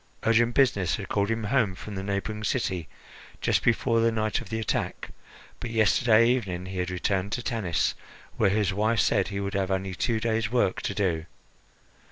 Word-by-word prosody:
Urgent 115 +1 +3
business 100 -10 +3
had 100 -3 -7
called 100 0 0
him 115 0 -1
home 105 -3 +1
from 105 +2 -8
the 95 - -4
neighbouring 100 +2 -3
city 90 -5 -1 0.5
just - - +1
before 115 0 +2
the 115 0 +3
night 110 -2 -1
of - - -11
the 110 0 -2
attack; 110 - -3 0.5
but 120 - -5
yesterday 115 +1 +4
evening 100 -8 -1
he 95 0 -5
had 90 0 -1
returned 95 +2 -1
to 125 - -2
Tanis, 105 -10 0 0.4
where - - +3
his 105 0 +1
wife 110 +3 +1
said 100 - +2
he 100 -1 -4
would 100 0 -3
have 95 -1 0
only 95 0 -1
two 110 +5 0
days' 110 -1 -1
work 120 -7 +1
to 100 - -3
do. 85 -5 -1
105 Hz, 190 wpm, -27 LUFS, 95-115 Hz, 0.5 s, yesterday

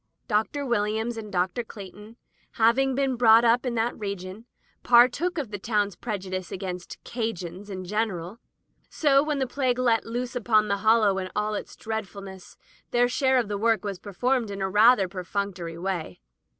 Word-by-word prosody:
Dr. 225 +6 0
Williams 220 0 0
and 215 -2 -7
Dr. 185 +5 0
Cleighton 210 +1 -11 0.4
having 255 +4 +3
been 270 -1 +1
brought 230 -1 +6
up 240 +3 +3
in 240 - -2
that 230 +1 0
region, 200 +1 -6 0.3
partook 255 +9 +4
of 270 -8 -3
the 205 - -5
town's 205 -2 0
prejudice 185 -5 -5
against 180 -2 -6
"Cajans" 205 -5 -5
in 185 -2 -6
general, 205 -1 -3 0.5
so 275 -3 +3
when 300 0 -1
the 265 - 0
plague 255 -1 -1
let 240 -3 +2
loose 240 +2 -4
upon 215 -3 +2
the 200 - +1
Hollow 215 -2 +3
in 185 0 -4
all 210 0 0
its - - -6
dreadfulness, 200 -3 -7 0.3
their 245 0 +3
share 260 +1 +2
of 240 -4 +1
the 205 -1 -3
work 225 -2 +1
was 200 -3 -4
performed 235 +4 -1
in 200 0 -5
a 190 - 0
rather 210 0 +5
per 185 0 -6
functory 180 -4 -4
way. 175 - -4
215 Hz, 170 wpm, -26 LUFS, 195-240 Hz, 0.5 s, brought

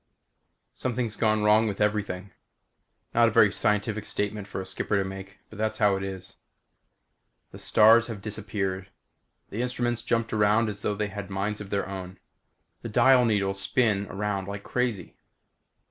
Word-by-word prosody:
Something's 120 -3 -3
gone 110 -1 +1
wrong 105 +1 +4
with 100 -2 -4
everything. 105 -3 -1 0.8
Not 120 0 +5
a - - +1
very 105 -3 +5
scientific 105 +1 0
statement 105 0 -3
for - - -5
a 95 - -5
skipper 95 +2 -1
to 100 - +1
make 95 0 -9
but 105 - -11
that's 110 0 -1
how 105 -2 +3
it 95 - -3
is. 95 -1 -7 1.1
The - - -10
stars 110 +2 +5
have 115 -4 -6
disappeared. 95 -2 -4 0.6
The 110 - -3
instruments 120 -1 -1
jumped 115 -1 -1
around 105 +1 +3
as 105 - -6
though 105 - -1
they 105 0 -2
had 100 -1 -7
minds 100 +2 -2
of 100 - -8
their 100 -1 -1
own. 95 -1 -7 0.6
The 115 - -6
dial 125 +3 +5
needles 100 -3 0
spin 105 -5 +1
around 100 -1 -3
like 100 0 -6
crazy. 120 -7 -2
105 Hz, 160 wpm, -26 LUFS, 100-110 Hz, 1.1 s, Not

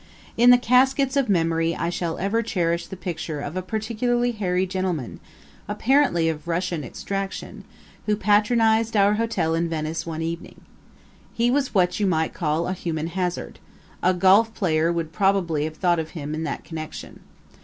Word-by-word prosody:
In 240 +2 +5
the 245 - +9
caskets 260 +3 +3
of 275 -5 +1
memory 165 -2 +1
I 170 - -2
shall 170 -2 -3
ever 200 +5 0
cherish 170 -7 -1
the 190 - -8
picture 165 -4 -4
of 145 +3 -5
a 185 - -1
particularly 235 +5 -1
hairy 190 -4 0
gentleman, 185 - -3 0.5
apparently 220 - +2
of 155 -1 -3
Russian 170 -2 -1
extraction, 195 +9 -5 0.4
who 210 - +3
patronized 220 +2 +2
our 200 +1 +5
hotel 215 -7 0
in 165 +1 0
Venice 160 0 -3
one 160 -1 -4
evening. 165 +1 -6 0.7
He 235 +1 +2
was 275 -3 0
what 180 0 +2
you 205 - +2
might 160 -3 0
call 160 +1 -1
a 185 - -1
human 165 -3 -3
hazard 180 0 -3 0.4
a 185 +1 +3
golf 195 +5 +5
player 165 -3 +1
would 165 -1 -3
probably 185 -7 +1
have 155 0 -6
thought 175 -2 +2
of 160 0 -4
him 150 0 -4
in 160 +1 -3
that - - -4
connection. 155 -2 -8
180 Hz, 165 wpm, -23 LUFS, 165-215 Hz, 0.7 s, the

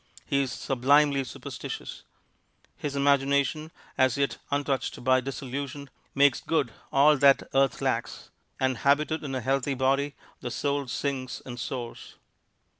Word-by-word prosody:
He 140 - +1
is 135 -2 -2
sublimely 140 +3 +3
superstitious. 125 - -7 0.7
His 145 -1 -4
imagination, 140 +2 +2 0.3
as 130 -1 +3
yet 140 -1 0
untouched 140 -3 -1
by 130 0 +4
disillusion, 135 +1 -5 0.2
makes 140 -2 +4
good 150 -8 0 0.2
all 145 +2 +5
that 140 0 +5
earth 135 0 +2
lacks, - - -2 0.3
and 130 -2 +1
habited 150 +3 +2
in 135 -2 -4
a 130 - -2
healthy 135 +2 0
body 135 +2 +1 0.2
the 125 - -5
soul 140 +2 -1
sings 130 0 -3
and 120 -2 -7
soars. 120 0 -6
135 Hz, 130 wpm, -27 LUFS, 130-140 Hz, 0.7 s, all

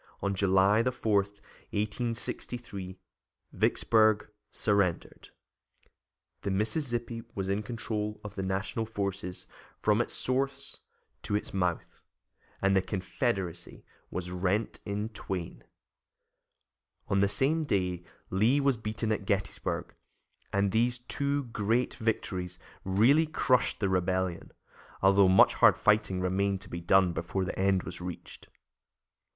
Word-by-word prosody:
On 100 0 +1
July 95 +2 +4
4, 120 -4 0
1863, 105 0 -4 0.6
Vicksburg 110 -2 +3 0.2
surrendered, 100 -5 0 1.1
the 100 - -2
Mississippi 115 +3 -1
was 95 -1 -2
in 100 +2 0
control 105 -1 -3
of 105 -1 -7
the 100 - -4
National 95 +4 -2
forces 100 -4 -4 0.3
from - - +3
its - - -3
source 135 +1 -2 0.4
to 105 - -2
its 105 - -3
mouth, 90 -3 -2 0.6
and 95 0 +4
the 95 - +4
Confederacy 95 - -3 0.2
was 90 -1 -4
rent 95 +4 -1
in 105 +1 -2
twain. 90 - -5 1.4
On 100 - +2
the 100 - +4
same 135 +11 +1
day 90 - -1 0.3
Lee 110 +9 +3
was 140 -3 +2
beaten 110 0 -2
at 105 -2 -1
Gettysburg, 100 -1 -2 0.6
and 100 0 +1
these 120 +3 +2
two 140 +3 -2
great 115 0 0
victories 90 -5 -2 0.3
really 120 +12 +4
crushed 130 -4 +2
the 100 - +1
Rebellion, 95 -1 -1 0.5
although 95 0 +6
much 95 - +6
hard - - +5
fighting 105 -3 +2
remained 95 +1 0
to - - -10
be 85 - -5
done 90 0 +4
before 85 +4 -2
the 95 - -5
end 95 -1 +2
was 85 +2 -6
reached. 90 -1 -8
100 Hz, 120 wpm, -29 LUFS, 95-115 Hz, 1.4 s, although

